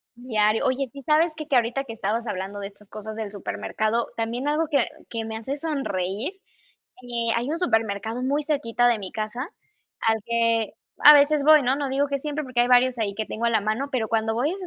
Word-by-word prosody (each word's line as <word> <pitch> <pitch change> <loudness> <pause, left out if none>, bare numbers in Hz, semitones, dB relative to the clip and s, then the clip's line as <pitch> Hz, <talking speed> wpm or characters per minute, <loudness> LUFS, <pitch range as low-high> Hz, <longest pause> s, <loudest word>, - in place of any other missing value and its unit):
Diario. 220 -3 +1
Oye, 260 0 0
sí, 280 - -10
¿sabes 310 +2 +3
qué?, 310 -2 -7
que 280 - +1
ahorita 245 +3 +1
que 230 - -7
estabas 225 +2 -2
hablando 195 0 -4
de 200 - -4
estas 200 0 -18
cosas 215 0 -7
del 215 -2 -5
supermercado, 210 - -2
también 235 +4 -2
algo 310 +2 +1
que 280 -5 +3 0.2
que 230 -1 -3
me 220 0 -5
hace 265 +5 -4
sonreír, 265 - -3 0.7
eh, 235 -2 -1
hay 240 +3 -1
un 320 - -1
supermercado 225 - 0
muy 285 +3 0
cerquita 245 -5 +1
de 235 -2 +1
mi 190 -2 -7
casa 215 +3 -4 0.6
al 225 0 +2
que, 230 -2 +1 0.3
a 300 - +10
veces 290 0 +5
voy, 305 0 +7
¿no?, 255 +1 +2
no 285 -1 -2
digo 275 +2 +1
que 280 0 -1
siempre, 300 +1 -3
porque 255 -2 0
hay 240 - +4
varios 250 0 +4
ahí 205 -3 -1
que 220 - -2
tengo 230 - -4
a - - +3
la 220 -2 +2
mano, 215 +7 -1
pero 235 -5 -1
cuando 225 0 0
voy 250 +7 +1
a - - -2
ese 380 -2 -7
235 Hz, 225 wpm, -24 LUFS, 220-280 Hz, 0.7 s, a